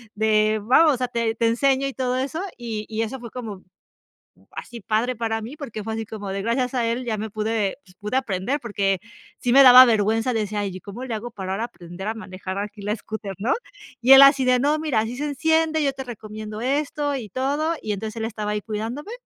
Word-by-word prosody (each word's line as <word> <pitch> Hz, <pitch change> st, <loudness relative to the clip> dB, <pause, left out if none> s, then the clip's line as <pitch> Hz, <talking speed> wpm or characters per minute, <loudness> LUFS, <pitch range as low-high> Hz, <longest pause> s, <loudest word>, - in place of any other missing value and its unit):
de, 215 Hz, 0 st, +2 dB
vamos, 290 Hz, +7 st, +5 dB
o -, -, -6 dB
sea, 250 Hz, 0 st, -1 dB
te 230 Hz, -2 st, -1 dB
te 230 Hz, -, +1 dB
enseño 270 Hz, +3 st, +2 dB
y 270 Hz, -, -5 dB
todo 255 Hz, -1 st, -1 dB
eso, 280 Hz, +6 st, -2 dB, 0.2 s
y 225 Hz, -3 st, -5 dB
y 220 Hz, 0 st, -1 dB
eso 250 Hz, +4 st, -5 dB
fue 235 Hz, -1 st, -8 dB
como 215 Hz, -6 st, -7 dB, 0.9 s
así 235 Hz, -2 st, -8 dB
padre 225 Hz, +5 st, 0 dB
para 225 Hz, -1 st, -1 dB
mí, 255 Hz, +7 st, -8 dB
porque 230 Hz, -8 st, -6 dB
fue 220 Hz, -, -4 dB
así 225 Hz, -1 st, -4 dB
como 205 Hz, -3 st, -6 dB
de 195 Hz, 0 st, -3 dB
gracias 250 Hz, +3 st, 0 dB
a 240 Hz, -2 st, +1 dB
él 240 Hz, +2 st, -1 dB
ya 225 Hz, -2 st, -1 dB
me 220 Hz, 0 st, -4 dB
pude, 215 Hz, 0 st, -1 dB
pues, 180 Hz, -, -20 dB
pude 210 Hz, +4 st, -3 dB
aprender, 245 Hz, +1 st, -1 dB
porque 200 Hz, -4 st, 0 dB, 0.4 s
sí 245 Hz, -, 0 dB
me 275 Hz, +2 st, +8 dB
daba 255 Hz, 0 st, +11 dB
vergüenza, 225 Hz, +1 st, +2 dB
decía 210 Hz, -2 st, -1 dB
yo: 185 Hz, -2 st, -5 dB
"Y, 185 Hz, -, -8 dB
¿cómo 225 Hz, +6 st, -8 dB
le 245 Hz, -, -5 dB
hago 235 Hz, +3 st, -5 dB
para 190 Hz, -4 st, -5 dB
ahora 210 Hz, +4 st, -2 dB
aprender 180 Hz, -3 st, -9 dB
a 220 Hz, -, -1 dB
manejar 190 Hz, -3 st, -6 dB
aquí 205 Hz, +1 st, -5 dB
la 210 Hz, +2 st, -1 dB
scooter?", 210 Hz, -2 st, -6 dB
¿no? 220 Hz, +7 st, 0 dB, 0.5 s
Y 255 Hz, +3 st, +6 dB
él 270 Hz, -, +11 dB
así 275 Hz, -1 st, +7 dB
de: 250 Hz, 0 st, +4 dB
"No, 290 Hz, +4 st, +2 dB
mira, 305 Hz, -8 st, +1 dB
así 225 Hz, +3 st, -3 dB
se 295 Hz, +3 st, -2 dB
enciende, 315 Hz, +2 st, +1 dB
yo 275 Hz, -, +1 dB
te 265 Hz, 0 st, -7 dB
recomiendo 215 Hz, -2 st, -7 dB
esto 290 Hz, +2 st, -1 dB
y 245 Hz, -6 st, -5 dB
todo". 285 Hz, -, -1 dB
Y 210 Hz, -, -2 dB
entonces 215 Hz, +2 st, -5 dB
él 225 Hz, -, -3 dB
estaba 215 Hz, -2 st, -3 dB
ahí 210 Hz, -1 st, -2 dB
cuidándome 230 Hz, -, -5 dB
230 Hz, 230 wpm, -23 LUFS, 210-260 Hz, 0.9 s, daba